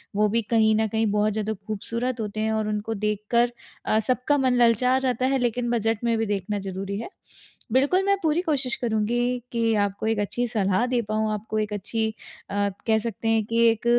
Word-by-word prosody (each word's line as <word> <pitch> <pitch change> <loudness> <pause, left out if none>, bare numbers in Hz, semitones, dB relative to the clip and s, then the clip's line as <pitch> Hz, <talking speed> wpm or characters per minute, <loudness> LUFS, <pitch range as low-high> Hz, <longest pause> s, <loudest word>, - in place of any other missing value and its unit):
वो 210 +1 +3
भी 230 +2 +1
कहीं 220 -1 +4
न 220 0 +2
कहीं 220 +1 0
बहुत 210 0 +1
ज़्यादा 220 0 -2
खूबसूरत 230 +4 -3
होते 215 0 -4
हैं 220 0 0
और 220 -1 0
उनको 210 +1 -2
देखकर 235 +4 +1 0.3
अ, 215 - +2
सबका 255 +3 +2
मन 260 -2 +2
ललचा 250 +3 +3
जाता 255 -1 0
है, 270 +1 +2
लेकिन 240 0 0
बजट 225 0 0
में 230 -1 +2
भी 225 - 0
देखना 205 0 -2
ज़रूरी 195 +1 -4
है। 300 - -6 0.6
बिल्कुल 290 +9 +3
मैं 400 0 +4
पूरी 320 +2 +2
कोशिश 275 -7 +1
करुँगी 225 0 0 0.3
कि 230 -1 +1
आपको 200 +2 -4
एक 220 -2 +1
अच्छी 240 +4 -1
सलाह 200 0 +1
दे 245 -1 +1
पाऊँ, 215 0 0
आपको 215 +1 -3
एक 210 -1 -2
अच्छी 220 +2 -1 0.4
अ, 200 0 0 0.2
कह 220 0 +4
सकते 225 0 -4
हैं 225 -1 +3
कि 230 +1 +2
एक 225 +1 -2
225 Hz, 200 wpm, -25 LUFS, 210-240 Hz, 0.6 s, कहीं